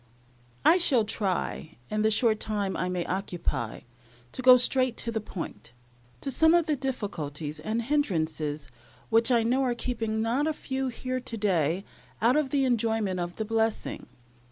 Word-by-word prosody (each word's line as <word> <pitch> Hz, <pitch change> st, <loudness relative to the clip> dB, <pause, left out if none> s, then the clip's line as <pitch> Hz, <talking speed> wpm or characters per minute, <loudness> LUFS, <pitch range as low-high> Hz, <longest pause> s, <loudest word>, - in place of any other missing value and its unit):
I 355 Hz, -, +6 dB
shall 260 Hz, -10 st, +4 dB
try, 190 Hz, -6 st, -3 dB
in 215 Hz, 0 st, 0 dB
the 215 Hz, -, +3 dB
short 220 Hz, 0 st, +2 dB
time 205 Hz, -3 st, -2 dB
I 180 Hz, -, -1 dB
may 180 Hz, -1 st, -2 dB
occupy, 170 Hz, -, -3 dB, 0.5 s
to -, -, -5 dB
go 255 Hz, 0 st, +9 dB
straight 255 Hz, 0 st, +2 dB
to 230 Hz, -, -3 dB
the 220 Hz, -1 st, -2 dB
point 120 Hz, -, -7 dB, 0.5 s
to 275 Hz, -, -3 dB
some 320 Hz, +5 st, +5 dB
of 340 Hz, -2 st, +3 dB
the 310 Hz, -2 st, +1 dB
difficulties 165 Hz, -, -4 dB
and 220 Hz, +9 st, -2 dB
hindrances 160 Hz, -, -1 dB, 0.4 s
which 225 Hz, +2 st, +4 dB
I 235 Hz, -3 st, +4 dB
know 250 Hz, +4 st, +2 dB
are 250 Hz, -2 st, +1 dB
keeping 225 Hz, -3 st, -2 dB
not 240 Hz, +7 st, +1 dB
a 315 Hz, -, +1 dB
few 265 Hz, -2 st, -3 dB
here 255 Hz, +1 st, -3 dB
to 245 Hz, -2 st, -6 dB
day 185 Hz, -3 st, +1 dB, 0.3 s
out 235 Hz, +4 st, +3 dB
of 300 Hz, -3 st, +1 dB
the 275 Hz, 0 st, +2 dB
enjoyment 225 Hz, -6 st, 0 dB
of 175 Hz, 0 st, -4 dB
the 220 Hz, -, -3 dB
blessing. 225 Hz, 0 st, -1 dB
225 Hz, 170 wpm, -27 LUFS, 185-255 Hz, 0.5 s, go